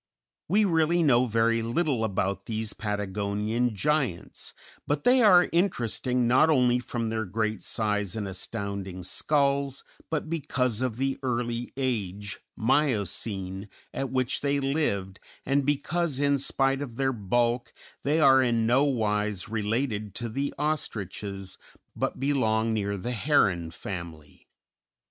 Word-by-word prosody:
] -, -, -66 dB
We 210 Hz, +4 st, +4 dB
really 165 Hz, -1 st, +3 dB
know 130 Hz, -4 st, +4 dB
very 115 Hz, 0 st, +2 dB
little 120 Hz, +1 st, 0 dB
about 100 Hz, -2 st, -1 dB
these 110 Hz, -1 st, -2 dB
Patagonian 105 Hz, +3 st, -1 dB
giants, 135 Hz, -, -1 dB, 0.3 s
but 145 Hz, 0 st, 0 dB
they 250 Hz, +1 st, +5 dB
are 185 Hz, -5 st, +7 dB
interesting 125 Hz, -, +1 dB
not 130 Hz, +6 st, +5 dB
only 125 Hz, -4 st, +4 dB
from 120 Hz, -2 st, -3 dB
their 110 Hz, 0 st, -1 dB
great 110 Hz, 0 st, -2 dB
size 105 Hz, -3 st, -1 dB
and 105 Hz, -3 st, -3 dB
astounding 95 Hz, -1 st, -5 dB
skulls, 140 Hz, -, 0 dB, 0.3 s
but 160 Hz, 0 st, -2 dB
because 130 Hz, -7 st, -1 dB
of 125 Hz, -3 st, -1 dB
the 135 Hz, +1 st, -1 dB
early 120 Hz, -2 st, -2 dB
age 105 Hz, -6 st, -2 dB, 0.2 s
(Miocene) 105 Hz, -, 0 dB, 0.2 s
at 135 Hz, 0 st, -2 dB
which 130 Hz, 0 st, 0 dB
they 140 Hz, 0 st, +1 dB
lived 135 Hz, -10 st, -1 dB, 0.3 s
and 140 Hz, +1 st, +1 dB
because 145 Hz, +1 st, 0 dB
in 140 Hz, -1 st, +2 dB
spite 135 Hz, 0 st, +1 dB
of 125 Hz, -5 st, -6 dB
their 135 Hz, +1 st, +1 dB
bulk 120 Hz, +3 st, 0 dB, 0.3 s
they 150 Hz, +3 st, +1 dB
are 135 Hz, -3 st, +6 dB
in 115 Hz, -3 st, +2 dB
nowise 110 Hz, -6 st, +1 dB
related 110 Hz, -1 st, -2 dB
to 120 Hz, -1 st, -3 dB
the 140 Hz, +5 st, -2 dB
ostriches, 100 Hz, -, -3 dB, 0.4 s
but -, -, -2 dB
belong 115 Hz, -5 st, +1 dB
near 100 Hz, -2 st, -1 dB
the 120 Hz, +6 st, -4 dB
heron 100 Hz, -, +2 dB
family. 85 Hz, -3 st, -8 dB
120 Hz, 130 wpm, -27 LUFS, 105-140 Hz, 0.4 s, are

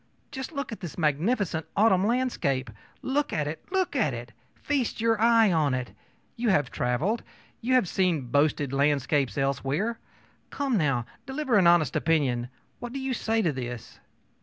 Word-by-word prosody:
Just 265 Hz, +1 st, -6 dB
look 280 Hz, -4 st, -4 dB
at 225 Hz, -, -6 dB
this 175 Hz, -7 st, -7 dB
magnificent 160 Hz, -, 0 dB
autumn 200 Hz, -2 st, +4 dB
landscape! 195 Hz, -, 0 dB, 0.3 s
Look 285 Hz, +2 st, 0 dB
at 150 Hz, -2 st, -1 dB
it! 155 Hz, +2 st, -5 dB
look 375 Hz, -5 st, 0 dB
at 180 Hz, -, +1 dB
it! 120 Hz, 0 st, -8 dB, 0.2 s
Feast 275 Hz, -5 st, -2 dB
your 225 Hz, -1 st, +1 dB
eye 230 Hz, -3 st, +5 dB
on 150 Hz, -6 st, +2 dB
it! 125 Hz, -1 st, -5 dB, 0.4 s
You 235 Hz, -1 st, 0 dB
have 145 Hz, -10 st, +2 dB
traveled; 150 Hz, -, 0 dB, 0.4 s
you 255 Hz, +3 st, +2 dB
have 250 Hz, -7 st, +3 dB
seen 180 Hz, -4 st, +1 dB
boasted 145 Hz, -1 st, +1 dB
landscapes 140 Hz, -1 st, +1 dB
elsewhere. 140 Hz, -, -1 dB, 0.5 s
Come, 275 Hz, -3 st, -1 dB
now, 135 Hz, -, +1 dB, 0.2 s
deliver 265 Hz, -2 st, -1 dB
an 190 Hz, -4 st, +5 dB
honest 170 Hz, -6 st, +4 dB
opinion. 130 Hz, -7 st, +1 dB, 0.3 s
What 240 Hz, 0 st, -7 dB
do 275 Hz, -, -3 dB
you 265 Hz, -1 st, -2 dB
say 225 Hz, -1 st, 0 dB
to 165 Hz, -, +2 dB
this? 120 Hz, -3 st, -7 dB
175 Hz, 160 wpm, -27 LUFS, 140-235 Hz, 0.5 s, eye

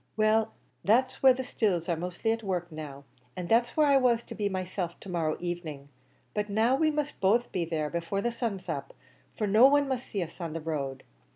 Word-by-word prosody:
"Well, 215 Hz, +1 st, +3 dB, 0.3 s
that's 255 Hz, +5 st, +2 dB
where 265 Hz, -1 st, +7 dB
the 260 Hz, -, -3 dB
stills 195 Hz, -9 st, 0 dB
are 170 Hz, -, +1 dB
mostly 180 Hz, +6 st, -2 dB
at 225 Hz, 0 st, -1 dB
work 180 Hz, -4 st, -3 dB
now, 145 Hz, -3 st, -8 dB, 0.3 s
an' 180 Hz, -, -4 dB
that's 235 Hz, -, +2 dB
where 305 Hz, -, +5 dB
I 280 Hz, -1 st, +5 dB
was 240 Hz, -3 st, +3 dB
to -, -, -9 dB
be 205 Hz, -2 st, -1 dB
myself, 185 Hz, -2 st, -4 dB
to 195 Hz, -, -9 dB
morrow 165 Hz, -3 st, -1 dB
evening; 165 Hz, -5 st, -5 dB, 0.4 s
but 210 Hz, 0 st, -2 dB
now 225 Hz, +5 st, +3 dB
we 310 Hz, +3 st, +3 dB
must 300 Hz, -1 st, -3 dB
both 225 Hz, +5 st, +3 dB
be 175 Hz, -3 st, -1 dB
there 160 Hz, -2 st, -1 dB
before 170 Hz, +3 st, -2 dB
the 240 Hz, -, 0 dB
sun's 215 Hz, -6 st, -3 dB
up, 140 Hz, -5 st, -4 dB, 0.4 s
for 215 Hz, -, 0 dB
no 215 Hz, +6 st, +7 dB
one 285 Hz, 0 st, +3 dB
must 260 Hz, -2 st, -3 dB
see 195 Hz, -3 st, -2 dB
us 170 Hz, +2 st, -10 dB
on 165 Hz, -2 st, -4 dB
the 165 Hz, -, -3 dB
road. 140 Hz, -4 st, -4 dB
195 Hz, 215 wpm, -29 LUFS, 170-235 Hz, 0.4 s, where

